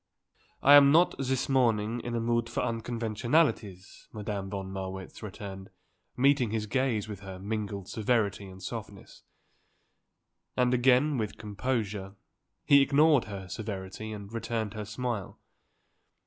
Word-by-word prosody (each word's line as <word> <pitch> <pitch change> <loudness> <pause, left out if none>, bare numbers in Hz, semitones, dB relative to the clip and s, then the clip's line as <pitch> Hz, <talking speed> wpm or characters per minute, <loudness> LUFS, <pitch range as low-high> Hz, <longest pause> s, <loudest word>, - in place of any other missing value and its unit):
"I 140 - +8
am 140 -1 +9
not, 170 +4 +5
this 130 -1 0
morning, 115 -4 +2
in 120 0 -4
a - - 0
mood 115 0 0
for - - -2
unconventionalities," 115 - -1
Madame 105 -3 -4
von 95 -1 -5
Marwitz 95 -1 -6
returned, 95 -2 -8 0.5
meeting 135 -2 +3
his 110 0 -2
gaze 120 -2 0
with 105 -3 -7
her 95 -1 -8
mingled 100 -1 -4
severity 105 -3 0
and 95 0 -12
softness. - - -8 1.4
And 125 0 +3
again, 130 +3 +3
with 105 -2 -3
composure, 105 -3 -3 0.5
he 140 -1 +7
ignored 145 0 +4
her 100 -3 -7
severity 100 +1 -6
and 100 0 -8
returned 115 -2 -3
her 105 -1 -5
smile. 110 -1 -4
110 Hz, 130 wpm, -29 LUFS, 100-125 Hz, 1.4 s, am